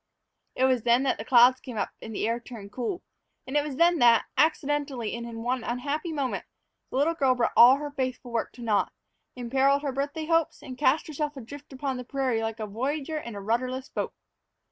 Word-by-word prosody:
It 255 - 0
was 260 -2 +3
then 240 +3 +3
that 270 - 0
the - - -4
clouds 250 +1 +6
came 245 -4 -8
up - - -1
and 220 -1 -7
the 215 - 0
air 230 +1 0
turned 225 -4 -10
cool. 250 - -4 0.4
And 265 - -6
it 295 - +5
was 290 -2 -5
then 340 +2 +4
that, 235 -1 +5
accidentally, 290 -6 0
and 235 0 -6
in 225 -1 -7
one 250 0 -1
unhappy 285 +7 -3
moment, 280 -5 -2 0.5
the - - -3
little 300 +5 +3
girl 265 -5 +2
brought 240 -2 0
all 245 +3 +9
her 290 +1 -5
faithful 255 -2 -4
work 230 -1 -1
to 245 - -10
naught, 215 -3 +1 0.4
imperiled 270 +3 +2
her 280 - -1
birthday 285 +4 -3
hopes, 330 -1 +1
and 255 - -7
cast 285 +2 +2
herself 295 -1 -4
adrift 285 +4 -10
upon 265 0 -3
the 250 - -5
prairie 255 -3 -1
like 225 0 -3
a 215 - -2
voyager 275 +8 -3
in 235 -7 -8
a 200 - -6
rudderless 255 +5 -1
boat. - - -3
260 Hz, 210 wpm, -27 LUFS, 235-290 Hz, 0.5 s, all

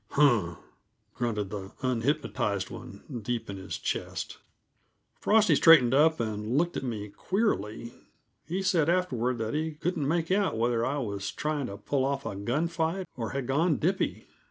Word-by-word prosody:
"Huh!" 115 - +3 0.6
grunted 105 -5 -2
the 100 -2 -6
unhypnotized 120 -5 0
one, 115 -3 -9 0.2
deep 115 -1 -3
in 100 - -6
his 95 -1 -5
chest. - - -4 0.8
Frosty 215 -1 +4
straightened 135 -7 +7
up 160 +3 +4
and 110 +2 -1
looked 170 +2 +1
at - - -2
me 110 -5 -4
queerly; 115 - -1 0.5
he 185 +4 -2
said 175 -5 +3
afterward 130 -9 +1
that 110 -1 -2
he 155 +1 -1
couldn't 155 -2 -2
make 165 +2 0
out 195 - +2
whether 115 0 +1
I 135 +4 0
was 100 -7 -3
trying 150 -3 -2
to 100 - -7
pull 135 +5 -1
off 140 0 -1
a 110 -3 -3
gun 120 +12 0
fight, 170 +3 -1
or 115 -3 -3
had 135 -2 -3
gone 150 +5 +2
dippy. 190 +5 -1
130 Hz, 160 wpm, -28 LUFS, 110-160 Hz, 0.8 s, straightened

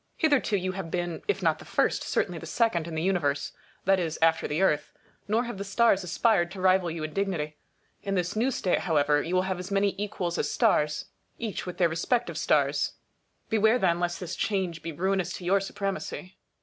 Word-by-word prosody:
Hitherto 285 -9 +2
you 185 0 -2
have 185 -3 -5
been, 175 -1 -3
if 415 - 0
not - - +2
the - - -10
first, - - +1
certainly - - -1
the - - -8
second 200 -9 +1
in 165 - -5
the 160 - -1
Universe; 160 -7 0 0.3
that 195 0 +4
is, 165 -3 -2
after 160 0 +3
the 150 - -1
Earth; 150 -6 +2 0.4
nor 220 +3 +2
have 235 -5 -6
the - - -2
stars 200 -1 +3
aspired 175 0 +2
to 190 +1 -9
rival 185 -1 +3
you 160 -1 -4
in 155 0 -5
dignity. 160 -6 -2 0.4
In 195 0 -2
this 180 +2 -1
new 235 +5 +2
state, 190 -8 0
however, 150 -3 +2
you 175 +4 -2
will 185 - +3
have 190 -1 -2
as 180 +1 -6
many 200 0 +2
equals 185 -4 -2
as - - 0
stars, 150 0 +2 0.3
each 220 -5 -4
with 180 - -5
their 175 - +4
respective 200 +10 -1
stars. - - +2 0.5
Beware 220 +2 +3
then 175 -6 +2
lest 175 0 -1
this 180 0 -5
change 185 -6 -1
be 165 - -5
ruinous 185 +2 -1
to 180 - -7
your 195 +3 +4
supremacy. 195 -1 -5
185 Hz, 205 wpm, -27 LUFS, 170-200 Hz, 0.5 s, that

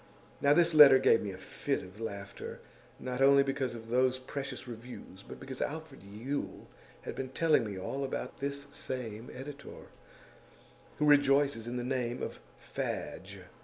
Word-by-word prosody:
Now 145 +1 +5
this 170 0 +4
letter 145 -3 +10
gave 130 -3 +4
me 100 - -3
a 95 - -8
fit 135 +8 -3
of 95 +4 -12
laughter; 100 -3 -6 0.4
not 125 +1 -3
only 140 0 +7
because 135 -3 -2
of 115 -1 -10
those 130 +1 +3
precious 135 +1 -6
reviews, 115 -4 -9
but - - -11
because 135 -1 -7
Alfred 155 -2 -4
Yule 110 +9 -5 0.4
had - - -5
been 130 -1 -4
telling 155 -1 +3
me 100 -2 -5
all 135 +9 -3
about 135 - -4
this 140 0 -3
same 115 -3 -5
editor, 140 +2 -9 1.1
who 150 - +1
rejoices 140 -4 +4
in 120 +1 -3
the 120 - -2
name 125 -1 -2
of - - -5 0.2
Fadge. - - -5
130 Hz, 160 wpm, -32 LUFS, 115-140 Hz, 1.1 s, letter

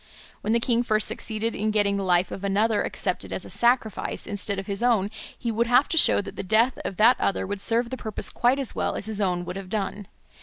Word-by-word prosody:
When 215 - -2
the 235 - +3
king 235 0 +1
first 215 -3 +2
succeeded 220 +1 -3
in 215 +1 -1
getting 205 -2 +1
the 200 - -2
life 180 -1 +2
of 195 - -7
another 210 +2 +1
accepted - - -3
as - - -4
a - - -10
sacrifice 235 -4 0
instead 205 -1 -3
of 195 - -4
his 200 +1 -3
own, 220 -5 +2 0.3
he 235 - -3
would 230 +2 0
have 250 +4 +4
to - - -1
show 315 - +5
that - - -9
the - - -4
death 225 +6 +2
of 190 - -5
that 235 +4 +5
other 195 - 0
would 200 0 -5
serve 235 +2 +1
the 260 - -4
purpose 220 -4 -1
quite 245 +3 +2
as 270 -5 +1
well - - -2
as - - -3
his 215 -1 -2
own 180 -2 0
would 180 +2 -6
have 195 -2 -8
done. 205 -1 -3
215 Hz, 245 wpm, -25 LUFS, 200-235 Hz, 0.3 s, show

